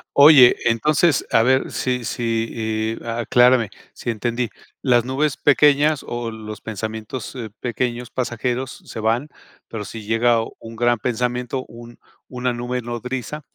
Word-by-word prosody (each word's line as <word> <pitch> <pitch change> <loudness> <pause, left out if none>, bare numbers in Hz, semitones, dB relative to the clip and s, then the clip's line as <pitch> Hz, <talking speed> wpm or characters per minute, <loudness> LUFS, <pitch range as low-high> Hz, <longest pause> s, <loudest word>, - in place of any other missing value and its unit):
Oye, 140 -4 +8
entonces, 150 +8 +2
a 115 - +5
ver 130 +2 +2
si 125 -1 -1
si, 115 -1 -2
y - - -13
aclárame, 120 0 +3 0.2
si - - -6
entendí. 120 +1 -1 0.3
Las 120 -3 +3
nubes 135 +3 0
pequeñas 145 +1 +4
o 120 -1 -4
los 110 -1 -8
pensamientos, 110 +3 -6
eh, 115 -4 -6
pequeños 120 0 -3
pasajeros 125 +1 -3
se - - -7
van, 115 +7 0 0.4
pero 105 -2 -6
si 110 +1 -8
llega 115 +1 +3 0.2
un, 115 0 -10
gran 120 +1 +2
pensamiento, 125 +2 -2
un 120 0 -13 0.3
una 125 0 -2
nube 125 +1 -3
nodriza, 125 +4 -5
120 Hz, 135 wpm, -21 LUFS, 115-130 Hz, 0.4 s, Oye